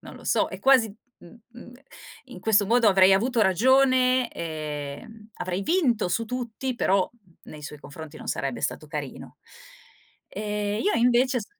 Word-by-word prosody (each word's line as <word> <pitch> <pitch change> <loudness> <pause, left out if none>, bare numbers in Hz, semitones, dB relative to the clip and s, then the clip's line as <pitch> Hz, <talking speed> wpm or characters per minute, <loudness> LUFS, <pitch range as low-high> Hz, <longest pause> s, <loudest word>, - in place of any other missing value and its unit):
non - - -12
lo - - -14
so, - - +2
è - - -8
quasi 265 -4 +5
i 205 - -12 0.2
i 235 +6 -15 0.5
in 245 -8 -12
questo 205 +1 +2
modo 230 +1 +4
avrei 190 -1 +5
avuto 235 +4 +1
ragione, 255 +4 +3
ehm, 155 +8 -7
avrei 185 +2 -4
vinto 245 - +1
su 230 +6 -1
tutti, 250 +1 -4
però 195 -5 +1 0.3
nei 150 -1 -11
suoi 150 0 -8
confronti 155 +2 -11
non - - -11
sarebbe 135 -3 -3
stato 155 +2 -3
carino. 150 -3 -7 0.9
E 210 0 -3
io 415 - +1
invece 250 +2 +2
s 205 - -9
215 Hz, 155 wpm, -25 LUFS, 175-245 Hz, 0.9 s, quasi